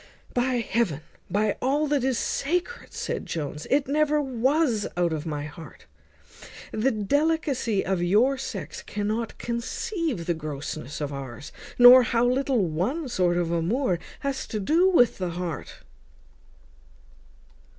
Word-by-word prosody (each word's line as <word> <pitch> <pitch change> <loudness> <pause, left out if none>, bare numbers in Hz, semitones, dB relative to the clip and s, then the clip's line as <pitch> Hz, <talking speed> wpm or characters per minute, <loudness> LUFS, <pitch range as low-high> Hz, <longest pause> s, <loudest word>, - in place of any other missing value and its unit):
"By 245 0 +1
heaven, 205 -10 0 0.3
by 205 +3 +1
all 280 +4 +1
that 290 -3 +1
is 260 -2 +1
sacred!" 355 - -2
said - - -4
Jones, 150 -1 -4
"it 275 0 +2
never 300 +1 +2
was 265 -3 +1
out 175 -2 +1
of 155 +1 -4
my 150 -2 -3
heart. 155 +2 -11 0.9
The 220 +5 +1
delicacy 270 -1 0
of 190 -2 0
your 215 +10 +3
sex 190 - -6
cannot 215 +3 -3
conceive 255 - -3
the 175 - +1
grossness 150 -2 -6
of 145 -1 -3
ours, 135 +1 -7 0.3
nor 245 +1 +10
how 235 0 +1
little 255 -3 +2
one 210 - -2
sort 180 -6 +1
of 170 -1 0
amour 180 +4 0 0.2
has 275 -1 -3
to 215 - -3
do 330 - +3
with 245 - +4
the 180 -1 -1
heart." 170 -2 -5
230 Hz, 135 wpm, -26 LUFS, 175-275 Hz, 0.9 s, nor